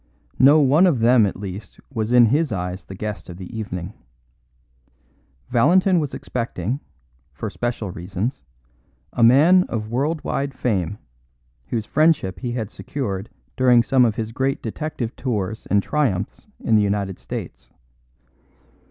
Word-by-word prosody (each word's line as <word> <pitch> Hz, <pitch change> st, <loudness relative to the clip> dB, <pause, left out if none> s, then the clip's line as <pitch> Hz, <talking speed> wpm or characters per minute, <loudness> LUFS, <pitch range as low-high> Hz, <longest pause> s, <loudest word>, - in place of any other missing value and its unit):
No 145 Hz, +4 st, +7 dB
one 150 Hz, +7 st, +5 dB
of 160 Hz, -7 st, +2 dB
them 115 Hz, -1 st, +5 dB
at -, -, -4 dB
least 100 Hz, 0 st, -8 dB
was 110 Hz, -1 st, -2 dB
in 125 Hz, -1 st, +7 dB
his 145 Hz, +5 st, +1 dB
eyes 90 Hz, -1 st, -4 dB
the 95 Hz, -, -9 dB
guest 105 Hz, -4 st, -6 dB
of 85 Hz, -, -8 dB
the 95 Hz, +3 st, -9 dB
evening. 95 Hz, -3 st, -5 dB, 1.6 s
Valentin 180 Hz, +8 st, +4 dB
was 150 Hz, -3 st, -3 dB
expecting, 115 Hz, 0 st, -3 dB, 0.5 s
for -, -, -5 dB
special 120 Hz, -5 st, -3 dB
reasons, 90 Hz, -, -4 dB, 0.7 s
a -, -, -2 dB
man 150 Hz, +11 st, +6 dB
of 110 Hz, -1 st, -4 dB
world 150 Hz, +6 st, -1 dB
wide 140 Hz, -1 st, -2 dB
fame, 105 Hz, -7 st, -1 dB, 0.7 s
whose 110 Hz, -3 st, -2 dB
friendship 150 Hz, -, +2 dB
he 120 Hz, -2 st, -3 dB
had 110 Hz, -3 st, -4 dB
secured 105 Hz, -8 st, -4 dB, 0.3 s
during 125 Hz, -2 st, +5 dB
some 130 Hz, 0 st, +3 dB
of 115 Hz, -3 st, +2 dB
his 110 Hz, 0 st, -4 dB
great 135 Hz, +3 st, -1 dB
detective 120 Hz, 0 st, -4 dB
tours 110 Hz, -4 st, -3 dB
and 100 Hz, -1 st, +2 dB
triumphs 115 Hz, -, -1 dB
in 115 Hz, -, +2 dB
the 105 Hz, -, +5 dB
United 100 Hz, -3 st, -1 dB
States. -, -, -7 dB
115 Hz, 145 wpm, -22 LUFS, 100-135 Hz, 1.6 s, No